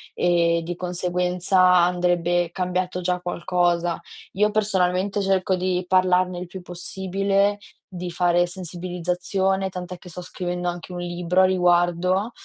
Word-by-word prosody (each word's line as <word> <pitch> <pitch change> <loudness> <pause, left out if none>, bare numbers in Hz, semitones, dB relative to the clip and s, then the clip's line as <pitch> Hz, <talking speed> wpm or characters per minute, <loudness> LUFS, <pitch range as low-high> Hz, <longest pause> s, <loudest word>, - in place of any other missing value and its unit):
e, 170 -1 +2
di 175 +1 -4
conseguenza, 180 +1 0 0.2
andrebbe 175 -1 +2
cambiato 180 0 -2
già 180 0 0
qualcosa. 175 -1 0 0.3
Io, 210 +2 +2
personalmente, 200 -1 0
cerco 190 -1 +1
di 180 0 -1
parlarne 185 -1 +2
il 180 - -6
più 185 0 -9
possibile, 195 +3 -1 0.3
di 180 -1 -6
fare 175 0 +2
sensibilizzazione, 180 +2 -2
tant'è 180 0 -7
che 180 - -13
sto 180 +2 -7
scrivendo 180 0 -4
anche 175 +1 -5
un 180 - -6
libro 175 +1 0
a - - +6
riguardo, 180 +3 +2
180 Hz, 130 wpm, -23 LUFS, 175-185 Hz, 0.3 s, a